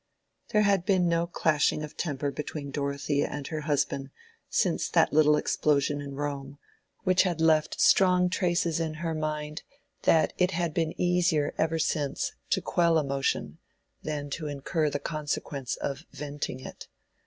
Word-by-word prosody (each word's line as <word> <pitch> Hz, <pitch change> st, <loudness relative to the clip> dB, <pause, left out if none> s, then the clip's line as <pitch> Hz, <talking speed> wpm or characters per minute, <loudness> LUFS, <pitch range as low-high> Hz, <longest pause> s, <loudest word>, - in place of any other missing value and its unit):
There 210 Hz, 0 st, +3 dB
had 200 Hz, -3 st, +3 dB
been 185 Hz, -2 st, +2 dB
no 170 Hz, 0 st, +1 dB
clashing 155 Hz, -2 st, +1 dB
of 150 Hz, 0 st, -8 dB
temper 145 Hz, -3 st, -2 dB
between 145 Hz, -1 st, -5 dB
Dorothea 140 Hz, 0 st, -1 dB
and 145 Hz, -1 st, -5 dB
her 155 Hz, -1 st, -3 dB
husband 140 Hz, -2 st, -1 dB, 0.4 s
since -, -, +1 dB
that -, -, +3 dB
little 150 Hz, 0 st, +5 dB
explosion 145 Hz, -1 st, +1 dB
in 140 Hz, -1 st, -7 dB
Rome, 140 Hz, -1 st, -4 dB, 0.5 s
which 185 Hz, 0 st, +4 dB
had 175 Hz, -4 st, 0 dB
left 160 Hz, -1 st, +3 dB
such -, -, -3 dB
strong 180 Hz, -1 st, +5 dB
traces 175 Hz, -3 st, 0 dB
in 160 Hz, -1 st, -2 dB
her 165 Hz, +1 st, -3 dB
mind 155 Hz, 0 st, -3 dB, 0.4 s
that 160 Hz, -1 st, +3 dB
it 180 Hz, 0 st, +4 dB
had 170 Hz, -3 st, -1 dB
been 165 Hz, -1 st, -1 dB
easier 175 Hz, -4 st, +2 dB
ever 160 Hz, 0 st, +1 dB
since 150 Hz, -3 st, -1 dB, 0.2 s
to -, -, +1 dB
quell 170 Hz, -2 st, +3 dB
emotion 135 Hz, -, -1 dB, 0.4 s
than 145 Hz, -2 st, -4 dB
to 155 Hz, +1 st, -3 dB
incur 150 Hz, +2 st, -1 dB
the 145 Hz, -, -2 dB
consequence 145 Hz, -3 st, -3 dB
of 140 Hz, +4 st, -4 dB
venting 145 Hz, -2 st, -5 dB
it. -, -, -9 dB
155 Hz, 155 wpm, -28 LUFS, 145-170 Hz, 0.5 s, little